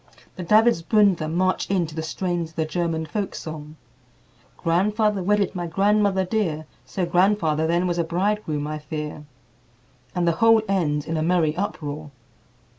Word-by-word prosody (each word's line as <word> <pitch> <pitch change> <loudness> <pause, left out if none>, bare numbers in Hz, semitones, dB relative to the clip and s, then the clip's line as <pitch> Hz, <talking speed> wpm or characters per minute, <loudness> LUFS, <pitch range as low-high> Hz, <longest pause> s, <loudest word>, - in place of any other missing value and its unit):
The 180 - -6
Davidsbündler 205 -4 +3
march 185 +2 0
in 190 -3 +1
to 155 - -9
the 160 - -3
strains 175 +1 -2
of 160 - -23
the 160 - 0
German 165 -1 -2
folk 200 +5 -4
song, 155 -1 -7 0.8
"Grandfather 205 +4 +1
wedded 200 +1 +1
my 175 -2 -3
grandmother 195 +2 +2
dear, 175 -7 -1 0.2
So 185 -3 -2
grandfather 170 -3 +2
then 170 +2 +1
was 175 -1 -1
a - - +2
bridegroom, 175 -3 -1
I 155 0 -4
fear," 150 0 -6 0.9
and 175 -1 +1
the - - +5
whole 225 -1 +6
ends 150 -7 0
in 165 - -2
a - - 0
merry 160 -2 +2
uproar. 155 -6 -4
175 Hz, 155 wpm, -23 LUFS, 160-195 Hz, 0.9 s, whole